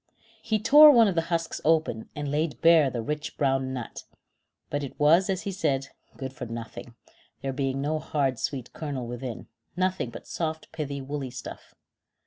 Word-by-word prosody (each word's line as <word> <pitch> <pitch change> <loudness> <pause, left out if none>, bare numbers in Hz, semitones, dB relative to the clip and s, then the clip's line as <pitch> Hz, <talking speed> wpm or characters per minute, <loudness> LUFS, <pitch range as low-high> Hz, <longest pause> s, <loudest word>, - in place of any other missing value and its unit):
He 220 - 0
tore 290 +8 +8
one 235 -6 +7
of 195 - +1
the 165 - +1
husks 165 -1 -2
open, 155 -8 +1
and 145 -1 -3
laid 150 -4 -1
bare 165 -4 +6
the 120 -3 -4
rich 150 +5 -4
brown 135 -2 +1
nut; 125 -3 -6 0.7
but 145 0 -1
it 135 - -8
was, 165 +6 +5
as 190 -1 -1
he 200 - -3
said, 140 -8 -1 0.3
good 130 -1 -6
for 120 -2 -7
nothing, 115 +1 -8 0.5
there 135 -1 -2
being 135 0 -1
no 155 +2 -1
hard 135 -6 -1
sweet 130 -4 -4
kernel 140 -5 -4
within, 120 0 -6 0.3
nothing 185 -8 0
but - - -10
soft 160 -1 -4
pithy 145 -3 -4
woolly 135 0 -4
stuff. - - -9
145 Hz, 175 wpm, -27 LUFS, 130-165 Hz, 0.7 s, tore